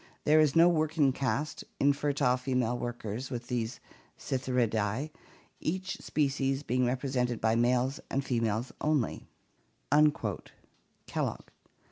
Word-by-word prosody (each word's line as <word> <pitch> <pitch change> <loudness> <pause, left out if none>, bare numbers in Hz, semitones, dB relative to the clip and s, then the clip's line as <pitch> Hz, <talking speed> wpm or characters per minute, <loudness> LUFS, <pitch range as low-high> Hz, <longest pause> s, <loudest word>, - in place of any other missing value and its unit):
There 155 +1 +5
is 150 -3 +3
no 165 +1 +7
working 155 -4 +2
caste, 140 +3 -2 0.2
infertile 140 -2 +2
female 125 -2 0
workers, 120 0 -4
with 120 -2 -6
these 120 -1 -2 0.4
Psithyridae, 125 0 -1 0.5
each 185 +3 -3
species 135 -1 0
being 125 -1 +1
represented 125 -2 -1
by 110 0 +2
males 125 +4 +2
and 135 0 -1
fe 125 -3 0
males 115 +2 -1
only" 150 -6 0 1.8
(Kellogg). - - -3
130 Hz, 110 wpm, -30 LUFS, 120-145 Hz, 1.8 s, no